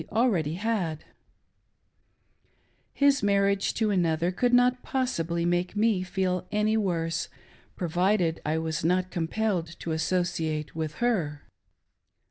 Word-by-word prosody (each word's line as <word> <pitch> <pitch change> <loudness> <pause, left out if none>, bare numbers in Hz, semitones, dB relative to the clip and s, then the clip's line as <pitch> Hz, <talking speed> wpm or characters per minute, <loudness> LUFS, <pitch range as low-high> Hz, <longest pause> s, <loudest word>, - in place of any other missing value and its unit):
already 200 - +1
had, 185 -6 -2 0.9
— - - -42
his 280 -1 +3
marriage 200 -1 +2
to 215 -2 +1
another 170 -2 +1
could 245 +6 +1
not 250 0 +4
possibly 170 - -1
make 175 +2 0
me 210 -2 +2
feel 185 -1 -1
any 210 +1 +1
worse, 165 -6 -1 0.5
provided 175 0 +1
I 155 +1 0
was 160 0 -2
not 180 +2 +1
compelled 170 -1 -2
to 165 - -4
associate 160 -2 -1
with 155 -1 -3
her. 155 -12 -1
180 Hz, 115 wpm, -27 LUFS, 165-215 Hz, 0.9 s, not